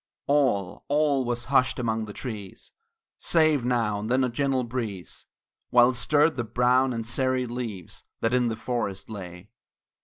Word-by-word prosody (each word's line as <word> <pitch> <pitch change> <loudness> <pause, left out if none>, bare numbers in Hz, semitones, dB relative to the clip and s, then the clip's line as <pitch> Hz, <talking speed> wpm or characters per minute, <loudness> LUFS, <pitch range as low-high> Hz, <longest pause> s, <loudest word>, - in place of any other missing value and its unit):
All, 130 -10 +1
all 145 -2 +2
was 120 0 -2
hushed 130 - +2
among 110 -3 -1
the 105 - -8
trees, 105 -7 -8 0.5
Save 155 -5 +3
now 115 -4 0
and 105 +2 -5
then 130 +2 +3
a 125 - +1
gentle 130 +1 0
breeze, 115 -7 -6 0.4
Which 125 +1 +5
stirr'd 150 +5 +2
the 120 - 0
brown 125 +3 +2
and 115 -2 -3
serried 130 0 0
leaves 115 -8 -6 0.2
That 115 +2 0
in 125 -1 +3
the 115 - -1
forest 110 -4 -4
lay. 90 0 -9
120 Hz, 155 wpm, -26 LUFS, 110-130 Hz, 0.5 s, Which